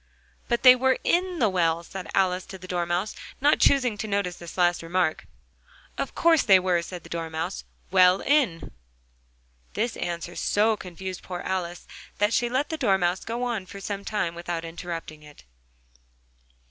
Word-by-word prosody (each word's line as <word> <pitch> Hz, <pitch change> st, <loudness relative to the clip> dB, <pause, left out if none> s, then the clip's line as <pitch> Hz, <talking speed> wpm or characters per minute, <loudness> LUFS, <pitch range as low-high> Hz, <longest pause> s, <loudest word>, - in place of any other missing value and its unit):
"But 235 Hz, -1 st, 0 dB
they 255 Hz, -1 st, +10 dB
were 260 Hz, +1 st, +2 dB
in 360 Hz, +1 st, +1 dB
the 230 Hz, -, +3 dB
well," 170 Hz, -3 st, +1 dB, 0.3 s
Alice 185 Hz, -1 st, +2 dB
said -, -, -27 dB
to 190 Hz, -, -7 dB
the 185 Hz, 0 st, -11 dB
Dormouse, 175 Hz, +3 st, -1 dB, 0.3 s
not 290 Hz, +2 st, +3 dB
choosing 250 Hz, -7 st, +3 dB
to 220 Hz, -, -3 dB
notice 200 Hz, -3 st, -1 dB
this 170 Hz, +1 st, -10 dB
last 175 Hz, -1 st, +2 dB
remark. 165 Hz, -1 st, -1 dB, 0.7 s
"Of -, -, -4 dB
course 330 Hz, -3 st, +4 dB
they 195 Hz, -4 st, +6 dB
were," 180 Hz, -2 st, +1 dB
said 175 Hz, 0 st, -8 dB
the -, -, -13 dB
Dormouse, 165 Hz, +1 st, -4 dB, 0.3 s
"well 185 Hz, 0 st, +6 dB
in." 270 Hz, -, +1 dB, 1.0 s
This 230 Hz, +1 st, -1 dB
answer 175 Hz, 0 st, -4 dB
so 215 Hz, +2 st, +2 dB
confused 185 Hz, -1 st, -7 dB
poor 180 Hz, -1 st, -6 dB
Alice, 180 Hz, -2 st, -3 dB, 0.3 s
that 205 Hz, +2 st, +2 dB
she 240 Hz, +1 st, +1 dB
let 260 Hz, +4 st, 0 dB
the 320 Hz, -, -3 dB
Dormouse 190 Hz, -, +1 dB
go 235 Hz, +2 st, -3 dB
on 225 Hz, -6 st, -2 dB
for 200 Hz, -, -9 dB
some 200 Hz, 0 st, -5 dB
time 200 Hz, -5 st, -2 dB
without 170 Hz, -1 st, -4 dB
interrupting 165 Hz, -2 st, -7 dB
it. 150 Hz, -, -16 dB
185 Hz, 165 wpm, -26 LUFS, 175-225 Hz, 1.0 s, they